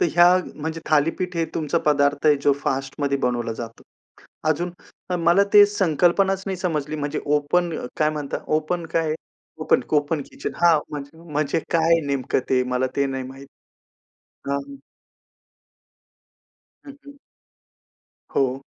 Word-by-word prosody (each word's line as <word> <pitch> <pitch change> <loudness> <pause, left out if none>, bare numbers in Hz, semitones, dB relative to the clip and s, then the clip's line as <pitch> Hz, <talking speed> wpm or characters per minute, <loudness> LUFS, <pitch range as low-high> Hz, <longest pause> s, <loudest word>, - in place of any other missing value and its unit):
तर - - +4
ह्या 175 0 +7 0.3
म्हणजे 160 +2 -5
थालीपीठ 165 +4 +1
हे 165 - +1
तुमचा 160 +1 0
पदार्थ 145 0 +2
आहे 150 - +6
जो 145 - +5
फास्टमध्ये 135 +1 -1
बनवला 120 -3 -1
जातो. 115 0 -8 0.7
अजून 175 +3 0 0.4
अ, 180 - 0
मला 170 +4 +4
ते 205 0 +10
संकल्पनाच 190 0 +2
नाही 190 -1 -3
समजली, 155 -4 -2
म्हणजे 145 -1 -3
ओपन 150 +4 +1 0.3
काय 155 -1 +3
म्हणता, 150 -2 -4 0.2
ओपन 165 +2 -3
काय? 160 -2 +1 0.5
ओपन, - - +3
ओपन 145 +1 +1
किचन, - - -5
हां, 170 -2 +5
म्हणजे 145 +1 -8
म्हणजे 150 +2 0
काय 165 0 +4
नेमकं 140 -1 0
ते 130 -1 +3
मला 130 +1 +1
ते 140 - +2
नाही 135 -1 -3
माहीत. 135 +1 -11 1.0
हां. 140 0 0
हं. 140 - -9 2.1
हं, 280 - -9
हं. 285 - -10 1.2
हो. 135 0 +1
150 Hz, 140 wpm, -23 LUFS, 140-170 Hz, 2.1 s, ते